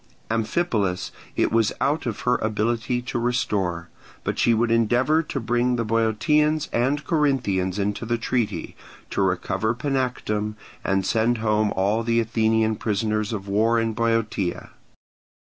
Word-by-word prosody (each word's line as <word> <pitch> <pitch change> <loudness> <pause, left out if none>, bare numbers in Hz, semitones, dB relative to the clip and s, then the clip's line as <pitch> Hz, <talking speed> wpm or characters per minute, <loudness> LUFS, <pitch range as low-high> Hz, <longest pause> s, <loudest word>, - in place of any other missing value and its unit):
Amphipolis 110 - 0 0.2
it - - +1
was 115 -2 +3
out 145 -1 0
of 115 - -3
her 125 0 +2
ability 115 +3 -1
to 120 - -3
restore; 105 -9 -1 0.3
but - - -2
she 120 - +4
would 115 +1 +2
endeavour 120 +7 +3
to 150 -3 -4
bring 120 +1 +1
the 115 -1 -1
Boeotians 145 +8 +2
and 135 +5 +1
Corinthians 120 - +1
into 105 +2 -2
the 120 0 +1
treaty, 115 -1 -2 0.4
to - - 0
recover 95 +4 0
Panactum, 125 -6 -1 0.3
and 95 -1 +1
send 115 +3 +2
home 110 -1 +1
all 100 +4 +1
the 115 0 +1
Athenian 110 -1 +1
prisoners 110 0 -1
of 100 -3 -4
war 110 +4 +2
in 115 0 0
Boeotia. 115 -5 -1
115 Hz, 140 wpm, -24 LUFS, 105-120 Hz, 0.4 s, she